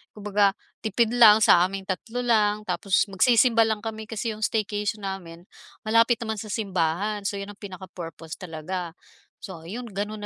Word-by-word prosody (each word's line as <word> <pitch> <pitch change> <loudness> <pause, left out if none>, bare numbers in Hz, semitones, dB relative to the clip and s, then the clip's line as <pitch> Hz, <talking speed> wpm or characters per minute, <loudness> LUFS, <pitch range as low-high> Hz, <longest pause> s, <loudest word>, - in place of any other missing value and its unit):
kumbaga 205 -1 +1 0.2
tipid 220 +1 0
lang 220 -3 +7
sa 170 - +7
aming 195 0 -6
3 225 +6 -4
lang 215 -3 +2
tapos 185 +1 +1
magsisimba 230 +2 +4
lang 220 -1 -2
kami. 220 -1 -6
Kasi 225 +1 -3
yung 215 - -8
staycation 210 -1 -1
namin 175 -3 -6 0.4
malapit 230 +2 +3
naman 220 -2 -3
sa 215 - -7
simbahan 200 0 -1
so 200 - -2
yun 200 +1 -6
ang 205 - -17
pinaka-purpose 175 -4 -9
talaga. 175 0 -5 0.5
So 175 -4 -9
ayun, 225 +9 -7
gano'n 210 0 -5
205 Hz, 160 wpm, -25 LUFS, 190-220 Hz, 0.5 s, lang